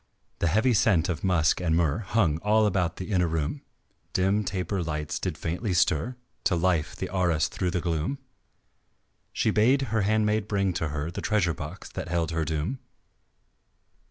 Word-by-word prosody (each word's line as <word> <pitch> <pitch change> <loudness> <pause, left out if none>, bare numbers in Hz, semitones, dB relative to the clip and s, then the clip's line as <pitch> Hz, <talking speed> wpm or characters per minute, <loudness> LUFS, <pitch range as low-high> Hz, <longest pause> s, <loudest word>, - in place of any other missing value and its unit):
The 85 - +1
heavy 110 +9 +3
scent 95 -5 +3
of 85 - -3
musk 85 -3 +2
and 80 -2 +2
myrrh 80 0 +1
Hung 90 -7 +1
all 105 +3 +3
about 90 -4 +1
the 95 +3 -6
inner 90 -3 +2
room, 80 - -2 0.5
Dim 95 +3 +2
taper 95 0 -2
lights 75 -2 -3
did - - -3
faintly 90 +4 -2
stir 85 - +2 0.3
To 90 - +3
life 85 -3 +1
the - - -5
arras 85 -4 +2
through 90 +3 -2
the 90 -1 -1
gloom, 85 - -1 1.1
She - - +1
bade 130 +6 +3
her 110 - +2
handmaid 105 +1 +1
bring 100 -3 +1
to 80 -2 -1
her 75 +2 -3
The - - -5
treasure 100 -6 +1
box - - -7
that - - -5
held 85 -1 -1
her 80 -1 -1
doom. 80 - -2
90 Hz, 170 wpm, -27 LUFS, 80-105 Hz, 1.1 s, heavy